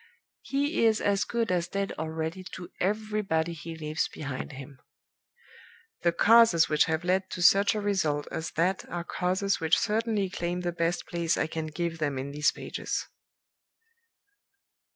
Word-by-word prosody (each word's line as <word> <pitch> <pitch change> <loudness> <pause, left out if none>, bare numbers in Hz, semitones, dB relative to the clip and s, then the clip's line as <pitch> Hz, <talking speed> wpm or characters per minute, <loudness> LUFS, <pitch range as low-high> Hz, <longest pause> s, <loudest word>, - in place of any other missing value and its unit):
He 285 0 0
is 220 -1 +4
as 200 0 +1
good 230 -4 -1
as 175 -1 +1
dead 195 +2 -2
already 160 +3 -3
to 180 -2 -8
everybody 200 -5 0
he 165 0 -7
leaves 155 0 -1
behind 140 0 -6
him. 135 0 -10 1.2
The 170 - +3
causes 215 -2 +6
which 150 -1 +3
have 160 +1 -1
led 185 +1 +1
to 180 - -3
such 200 +3 +5
a - - 0
result 160 -8 0
as 160 - -3
that 180 +4 +1
are 175 0 -3
causes 185 +3 0
which 160 -1 +3
certainly 220 -1 0
claim 175 -1 -2
the 175 -1 -1
best 170 0 -1
place 170 -1 -1
I - - +1
can 160 0 -4
give 165 +1 -3
them 145 -3 -1
in 135 +2 -4
these 150 +1 +2
pages." - - -4
175 Hz, 155 wpm, -28 LUFS, 160-200 Hz, 1.2 s, causes